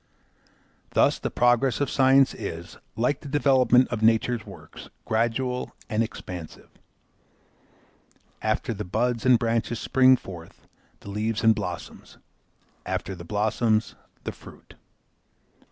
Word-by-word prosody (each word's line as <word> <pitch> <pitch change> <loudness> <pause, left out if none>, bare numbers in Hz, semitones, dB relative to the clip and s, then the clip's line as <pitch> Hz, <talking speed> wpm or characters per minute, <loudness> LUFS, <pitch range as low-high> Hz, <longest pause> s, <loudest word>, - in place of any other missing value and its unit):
Thus - - +3
the - - -3
progress 120 +1 +2
of 145 - +1
science 135 0 +4
is, 85 +1 -7 0.2
like 125 +6 0
the - - -11
development 130 -3 +4
of 115 -3 -3
nature's 115 +1 +2
works, - - -12 0.2
gradual 120 +3 -1 0.2
and 110 +1 +1
expansive. 90 -7 -7 1.7
After 110 +2 -1
the 105 0 -5
buds 115 +5 -1
and 125 -2 +7
branches 115 0 -1
spring 130 -1 +4
forth 85 -6 -12 0.4
the 100 - -9
leaves 110 +2 -2
and 110 0 +6
blossoms, 90 -5 -7 0.7
after 95 - -3
the 85 -2 -9
blossoms 110 +3 0 0.3
the - - -4
fruit. - - -15
115 Hz, 120 wpm, -25 LUFS, 105-125 Hz, 1.7 s, and